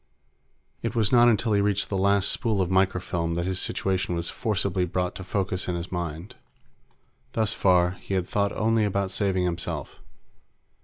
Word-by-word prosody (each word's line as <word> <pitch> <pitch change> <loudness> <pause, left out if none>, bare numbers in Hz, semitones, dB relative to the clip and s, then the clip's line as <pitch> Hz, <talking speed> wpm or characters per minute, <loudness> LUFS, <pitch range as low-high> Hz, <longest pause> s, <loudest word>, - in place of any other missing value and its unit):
It - - -3
was 110 -3 +2
not 120 -1 +6
until 115 -1 +2
he 100 - +3
reached 100 0 +1
the 100 - -2
last 100 0 +2
spool 110 -4 0
of 95 -1 0
microfilm 90 -3 0
that 85 0 -1
his 95 -1 -1
situation 95 -2 -1
was 85 0 -2
forcibly 100 -5 -1
brought 90 +1 -1
to 95 - -8
focus 95 -2 -2
in 90 - -1
his 85 +1 -5
mind. 85 +1 -4 1.0
Thus 110 -1 +1
far, 90 -2 +3
he 100 - -3
had 90 -1 -1
thought 100 -1 0
only 110 0 +2
about 100 -2 -1
saving 95 -3 0
himself. 85 -4 -4
95 Hz, 170 wpm, -26 LUFS, 90-100 Hz, 1.0 s, not